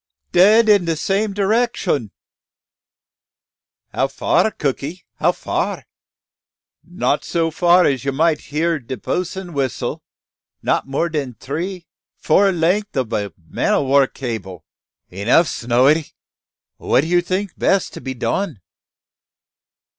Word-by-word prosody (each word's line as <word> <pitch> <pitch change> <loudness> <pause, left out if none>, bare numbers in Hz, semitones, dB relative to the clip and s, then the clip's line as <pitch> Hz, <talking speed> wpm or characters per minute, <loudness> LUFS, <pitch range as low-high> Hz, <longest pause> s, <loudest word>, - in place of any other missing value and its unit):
"Dead 215 +6 +6
in 205 -4 +5
dat 165 -1 -1
same 200 +5 0
direcshun." 220 +5 0 1.8
"How - - +1
fur, - - +1
cookey? 150 0 -4
how - - +3
fur?" - - -3 1.0
"Not - - -1
so 165 -1 -1
fur 175 +2 +4
as 135 -3 0
you 140 - -1
might 155 +2 +1
hear 160 +2 0
de 130 0 -7
bos'n's 180 - -3
whissel; 135 -5 -2 0.6
not - - 0
more 140 +5 0
dan 145 -7 -3
tree, 175 +6 -5 0.3
four 195 +5 +3
length 180 +2 0
ob 125 -4 -1
a 100 -2 -2 0.2
man - - 0
o' - - +1
war 135 0 +4
cable." 110 - -6 0.5
"Enough, 110 - +3
Snowy! 130 +6 +2 0.7
What 130 - +2
do 155 - -4
you 175 +1 +3
think 185 +2 -2
best 195 - +1
to - - -8
be 130 -1 -5
done?" 155 - -2
165 Hz, 125 wpm, -19 LUFS, 135-185 Hz, 1.8 s, Dead